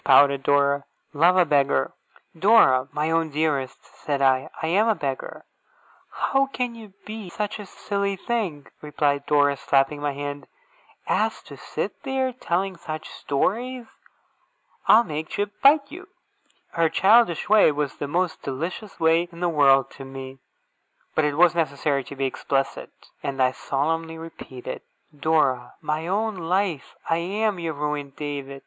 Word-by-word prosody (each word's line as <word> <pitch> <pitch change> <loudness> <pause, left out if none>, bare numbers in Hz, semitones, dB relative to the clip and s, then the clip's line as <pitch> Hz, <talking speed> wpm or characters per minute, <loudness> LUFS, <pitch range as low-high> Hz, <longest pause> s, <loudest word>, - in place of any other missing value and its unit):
pouted 140 0 +5
Dora. 140 0 +2 0.3
'Love 170 +5 +4
a 180 - +5
beggar!' 140 - +2 0.4
'Dora, 160 - +5
my 150 +2 -1
own 165 -1 +1
dearest!' 145 -3 -2
said 145 -2 -4
I. 130 -1 +2
'I - - -3
am 200 +7 +3
a 220 - +3
beggar!' 135 -6 -5 0.6
'How 275 0 +1
can 250 -3 -3
you 220 -4 -13
be 215 -3 -7
such 210 +4 -4
a 205 - -8
silly 200 0 -2
thing,' 190 -9 -3 0.2
replied 145 -1 -1
Dora, 145 -1 +3
slapping 140 +2 +1
my 145 -1 -1
hand, 145 0 -6 0.6
'as - - 0
to - - -11
sit - - -5
there, 265 -1 -1
telling 190 -5 -2
such 155 -2 -7
stories? 240 - -2 1.0
I'll 225 +2 +7
make 155 -4 -5
Jip 205 0 -2
bite 280 0 +5
you!' 365 +5 -10 0.6
Her 165 -1 +2
childish 195 0 +4
way 210 -5 +6
was 145 -1 -3
the 145 - -4
most 175 +3 -1
delicious 170 +10 -5
way 165 +2 +3
in 170 - -12
the 175 0 +1
world 135 -4 +4
to 135 - -10
me, 135 0 -9 0.7
but 155 - +2
it 145 -1 -1
was 175 0 +6
necessary 140 -3 0
to 140 - -9
be 135 0 -1
explicit, 135 +1 -2 0.3
and 135 -1 -4
I 130 -1 +4
solemnly 160 +5 -2
repeated: 160 -6 -8 0.3
'Dora, 140 -5 +1
my 155 +2 -3
own 210 +2 -1
life, 180 -2 -1
I 165 - +2
am 200 +3 -1
your 165 -2 -3
ruined 145 -1 -3
David! 140 -2 -5
160 Hz, 155 wpm, -24 LUFS, 140-195 Hz, 1.0 s, I'll